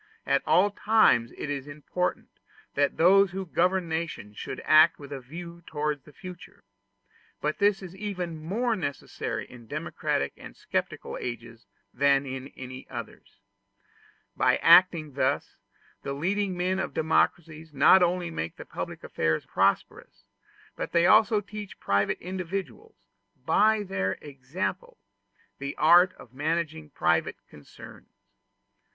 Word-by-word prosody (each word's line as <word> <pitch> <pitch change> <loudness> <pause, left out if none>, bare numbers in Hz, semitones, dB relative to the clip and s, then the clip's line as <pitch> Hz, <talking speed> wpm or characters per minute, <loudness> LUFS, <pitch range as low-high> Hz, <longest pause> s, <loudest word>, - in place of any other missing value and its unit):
At - - +2
all 200 +3 +4
times 205 - +3
it - - -4
is 140 -1 -4
important 150 +5 -3 0.4
that 140 0 +1
those 195 +4 +6
who 190 0 -4
govern 180 +1 +1
nations 160 -10 -4
should - - -6
act 155 0 +6
with 140 -1 -11
a 140 - -4
view 170 +6 -9
to 150 -1 -2
the 150 - -16
future: 180 +3 -12 0.8
but 150 +1 -2
this 200 -1 +2
is 185 0 -9
even 180 -5 -5
more 225 +8 0
necessary 145 - -4
in 120 -2 -14
democratic 70 -8 -2
and - - -12
sceptical - - -4
ages 115 -2 -7 0.3
than 140 +1 +3
in 130 0 -6
any 130 0 -9
others. - - -9 0.9
By - - +3
acting 170 -3 +5
thus, 140 +1 -1 0.4
the 140 - -4
leading 190 +5 -1
men 185 +2 0
of - - -4
democracies 160 0 0
not 150 +6 +6
only 175 0 +1
make 80 - -5
public - - -6
affairs 80 0 -1
prosperous, - - -1 0.5
but - - -5
they 170 0 +4
also 215 +2 +5
teach 210 0 -9
private 100 +1 +1
individuals, 185 - -6 0.5
by 215 +6 +3
their 95 - -1
example, 155 - -5 0.6
the 140 0 -5
art 175 +4 +6
of 120 - -16
managing 155 +2 -2
private 85 - +1
concerns. 75 -1 -14
160 Hz, 130 wpm, -27 LUFS, 140-185 Hz, 0.9 s, those